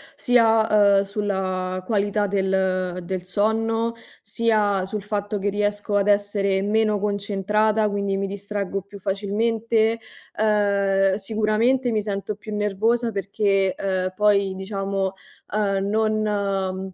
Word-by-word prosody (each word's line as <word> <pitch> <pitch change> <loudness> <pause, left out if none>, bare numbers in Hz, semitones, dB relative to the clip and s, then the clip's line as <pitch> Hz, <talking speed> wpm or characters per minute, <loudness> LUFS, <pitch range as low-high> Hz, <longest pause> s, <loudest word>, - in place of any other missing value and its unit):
sia, 220 -4 +4
uhm, - - +4
sulla 190 -2 -2
qualità 205 -1 0
del 190 -2 0
del 185 +1 -4
sonno, 225 +4 0 0.3
sia 210 -4 +1
sul 210 +2 -4
fatto 205 0 -3
che 205 +1 0
riesco 205 0 -1
ad 200 0 +2
essere 200 -1 +1
meno 215 0 +1
concentrata, 210 +1 +1
quindi 200 -1 -1
mi 195 0 -1
distraggo 200 0 -4
più 200 +1 -13
facilmente. 220 +3 0 0.4
Ehm, 200 -2 +2
sicuramente, 220 +5 +1
mi 215 -2 +1
sento 205 0 -3
più 210 +1 -7
nervosa 220 +4 0
perché, 195 -1 0
uhm, 185 -1 -1
poi, 200 -2 +2
diciamo, 195 0 -2 0.4
uhm, 195 -2 0
non 200 -3 -1
205 Hz, 115 wpm, -23 LUFS, 195-215 Hz, 0.4 s, sia